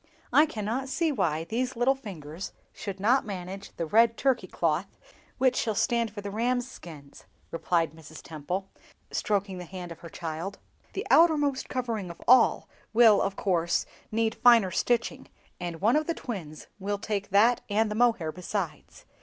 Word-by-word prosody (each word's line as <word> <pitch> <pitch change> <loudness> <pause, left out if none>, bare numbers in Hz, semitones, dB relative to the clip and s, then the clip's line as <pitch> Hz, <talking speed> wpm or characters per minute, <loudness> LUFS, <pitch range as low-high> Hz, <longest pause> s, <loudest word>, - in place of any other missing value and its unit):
"I 310 - +6
cannot 235 +2 -3
see 325 +3 +1
why 165 - 0
these 250 +8 -2
little 245 +3 +3
fingers 180 - -8 0.2
should 195 -2 -6
not 240 +7 +3
manage 195 0 -6
the 170 - -2
red 230 +6 +4
Turkey 255 -8 +1
cloth 170 +2 -1 0.4
which 255 0 +2
will 220 - 0
stand 235 +2 +1
for 205 0 -8
the 200 0 -5
rams' 245 +3 0
skins," 150 - -12 0.3
replied 165 -1 0
Mrs. 160 0 -12
Temple, 175 +5 -4 0.4
stroking 200 -3 -1
the - - -6
hand 180 0 -8
of 165 - -9
her 170 - -10
child; 165 +5 -5 0.4
"the - - -3
outermost 295 -5 +4
covering 230 -7 -3
of 170 - -9
all 250 -1 +5 0.3
will, 220 -3 +6
of 195 0 -1
course, 170 -4 +1 0.3
need 225 0 +1
finer 230 -7 +5
stitching, 240 +6 0 0.3
and 175 -2 -5
one 225 +6 +4
of 310 0 +1
the 335 - -1
twins 165 - -7
will 200 +1 -2
take 200 -1 -3
that 220 +5 +4
and 210 +1 +1
the - - 0
mohair 225 -8 +2
besides. 180 -3 -5
205 Hz, 165 wpm, -28 LUFS, 175-240 Hz, 0.4 s, I